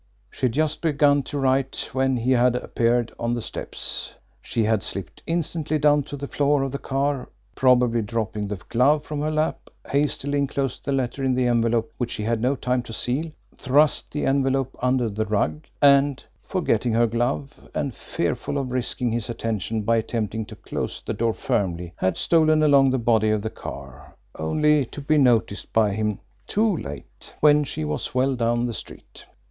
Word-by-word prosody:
She 130 - 0
had - - -2
but - - -8
just 155 0 0
begun 145 -3 +3
to 145 +2 -5
write 135 -1 0
when 130 -1 +1
he 120 +2 0
had 125 -1 +4
appeared 120 -1 0
on 120 +1 0
the 120 - -3
steps. - - -4 0.3
She 115 - -1
had 110 -1 +2
slipped 95 -2 -5
instantly 165 -2 -1
down 150 0 +4
to 145 - -7
the 140 +1 -5
floor 145 0 +1
of 135 - -2
the 140 - -4
car, 135 -1 -1 0.2
probably 125 -2 +3
dropping 105 -1 -3
the 105 - -3
glove 145 +5 +3
from 150 -1 -4
her 155 - 0
lap, 155 0 -1 0.2
hastily 145 0 0
inclosed 135 -2 -2
the 140 - -1
letter 135 0 -1
in 130 -1 +2
the 125 0 +1
envelope 115 +2 +1
which 120 -2 -1
she 105 - -3
had 115 0 0
no 130 +4 +2
time 125 -1 0
to 115 -2 -9
seal, 135 +9 -1 0.3
thrust 145 +3 +2
the 150 - -2
envelope 135 -1 +1
under 125 -1 +2
the 110 +1 -2
rug, 80 -7 -1 0.2
and, 140 -1 +5 0.2
forgetting 120 - 0
her 120 +1 +4
glove 120 +5 -2
and 140 -4 -1
fearful 140 - -3
of 135 -2 -3
risking 125 -1 -1
his 115 0 -2
attention 110 -1 -2
by 115 +2 +2
attempting 110 -1 -2
to - - -10
close - - -4
the - - -4
door 115 -1 0
firmly, 90 -3 -2
had 95 -2 0
stolen 155 -2 +3
along 140 -2 +5
the 130 - +1
body 115 -3 +2
of 110 -1 0
the 110 - -3
car, 65 -2 -10 0.2
only 150 - +2
to 130 - -9
be 150 +2 +2
noticed 115 -6 +2
by 110 -2 +3
him 105 -1 -1 0.3
too 215 -1 +2
late 70 0 -9
when 150 0 +5
she 80 - -4
was 75 +10 -3
well 130 +1 +2
down 120 0 +1
the 120 - -3
street! - - -10
125 Hz, 185 wpm, -24 LUFS, 115-140 Hz, 0.3 s, and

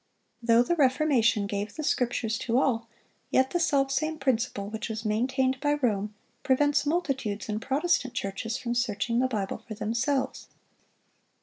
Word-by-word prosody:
Though 230 0 +5
the 345 - 0
Reformation 260 -7 +3
gave 205 +1 -4
the 310 - -4
Scriptures 240 -5 0
to 235 0 0
all, 230 -4 +1 0.4
yet 260 0 +2
the 350 - 0
selfsame 290 0 +1
principle 235 -7 -1
which 220 +2 -5
was 220 0 -5
maintained 260 +4 +1
by 290 +1 +1
Rome 210 -7 -1 0.3
prevents 290 +2 +2
multitudes 270 - -1
in 210 0 -2
Protestant 265 0 0
churches 225 +1 -3
from 240 -3 -3
searching 235 -1 0
the 260 - +3
Bible 205 -6 -3
for 215 - -6
themselves. 235 +6 -1
245 Hz, 145 wpm, -27 LUFS, 220-275 Hz, 0.4 s, Though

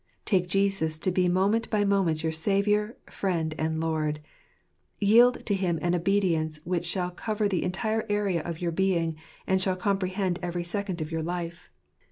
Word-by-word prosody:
Take 185 -4 +2
Jesus 195 -4 +1
to 185 +4 0
be 180 0 +2
moment 200 +5 +1
by 210 -2 +1
moment 190 -6 +1
your 160 - 0
Saviour, 205 +6 +1
Friend, 165 -5 -2
and 160 0 -1
Lord; 155 -2 -1 0.8
and 205 - 0
yield 240 +4 +5
to 205 - 0
Him 185 -4 0
an 175 0 +1
obedience 170 -4 +1
which 175 0 -1
shall 180 0 -1
cover 210 +3 -1
the 185 -4 0
entire 220 +4 -1
area 205 -5 +1
of 165 0 -5
your 175 -1 -1
being, 170 -2 +1 0.3
and 190 0 +2
shall 185 -1 +1
comprehend 185 -1 -1
every 175 -1 -3
second 190 -1 -3
of 155 +1 -4
your 160 0 -1
time. 170 0 -3
185 Hz, 175 wpm, -27 LUFS, 165-200 Hz, 0.8 s, yield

